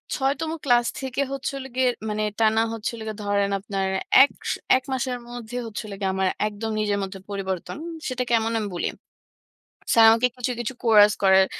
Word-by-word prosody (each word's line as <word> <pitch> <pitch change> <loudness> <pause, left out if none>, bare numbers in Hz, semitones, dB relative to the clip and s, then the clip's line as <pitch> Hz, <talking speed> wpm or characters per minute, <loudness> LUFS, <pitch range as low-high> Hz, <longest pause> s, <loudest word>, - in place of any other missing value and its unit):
৬ 270 0 +1
তম 320 -1 -2
ক্লাস 240 -2 +4 0.2
থেকে 265 +1 -2
হচ্ছে 275 -1 -3
হলো 265 -1 -6
গিয়ে 255 -1 +3 0.2
মানে 215 0 -1 0.2
টানা 220 0 +4
হচ্ছিল 225 +1 -4
গিয়ে 215 - -4
ধরেন 200 0 +1
আপনার 195 -1 -2 0.4
১ 285 - +2 0.2
স - - +2 0.2
১ 260 - -6
মাসের 255 -1 -1
মধ্যে 245 0 -6
হচ্ছে 220 +1 -6
হলো 200 - -7
গিয়ে 190 -1 +1
আমার 190 0 +1 0.2
একদম 215 +1 -4
নিজের 210 -1 0
মধ্যে 195 0 -6
পরিবর্তন। 190 0 -4 0.3
সেটা 255 -1 -1
কেমন 225 -1 +2
আমি 210 -2 -3
বলি। - - -1 1.1
স্যার 225 -1 +8
আমাকে 230 +2 +3
কিছু, 250 0 -2
কিছু 240 +2 -3
কোরাস 210 -2 +7
করার 190 0 +6
225 Hz, 185 wpm, -24 LUFS, 205-250 Hz, 1.1 s, স্যার